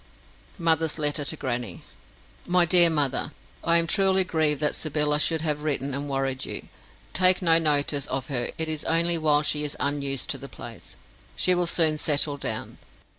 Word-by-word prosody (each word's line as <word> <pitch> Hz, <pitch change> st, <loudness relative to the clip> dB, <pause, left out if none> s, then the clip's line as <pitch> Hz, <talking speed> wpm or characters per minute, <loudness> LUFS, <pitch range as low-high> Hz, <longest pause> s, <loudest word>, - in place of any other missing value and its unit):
Mother's 160 Hz, -3 st, +1 dB
Letter 150 Hz, -1 st, 0 dB
to 160 Hz, -, 0 dB
Grannie 120 Hz, -, -5 dB, 0.6 s
MY 180 Hz, 0 st, +3 dB
DEAR 170 Hz, 0 st, +7 dB
MOTHER, 145 Hz, -1 st, -1 dB, 0.3 s
I 170 Hz, 0 st, +3 dB
am 170 Hz, -, +2 dB
truly 190 Hz, +2 st, +2 dB
grieved 155 Hz, -5 st, 0 dB
that 150 Hz, -, 0 dB
Sybylla 150 Hz, -1 st, -1 dB
should 160 Hz, +1 st, +1 dB
have 150 Hz, -2 st, -2 dB
written 140 Hz, -2 st, -3 dB
and 140 Hz, +1 st, -4 dB
worried 135 Hz, -1 st, -2 dB
you. -, -, -7 dB, 0.4 s
Take 185 Hz, +1 st, +4 dB
no 165 Hz, -1 st, +5 dB
notice 145 Hz, -2 st, 0 dB
of 130 Hz, -1 st, -4 dB
her; 125 Hz, -4 st, -2 dB
it 160 Hz, -, 0 dB
is 155 Hz, -1 st, -3 dB
only 170 Hz, +1 st, +2 dB
while 150 Hz, -1 st, +2 dB
she 150 Hz, 0 st, 0 dB
is 145 Hz, -, -5 dB
unused 140 Hz, -2 st, -2 dB
to -, -, -5 dB
the -, -, -10 dB
place. -, -, -11 dB, 0.4 s
She 185 Hz, -, +2 dB
will 175 Hz, -1 st, 0 dB
soon 160 Hz, -3 st, +2 dB
settle 145 Hz, -1 st, +1 dB
down. -, -, -4 dB
150 Hz, 175 wpm, -25 LUFS, 145-165 Hz, 0.6 s, DEAR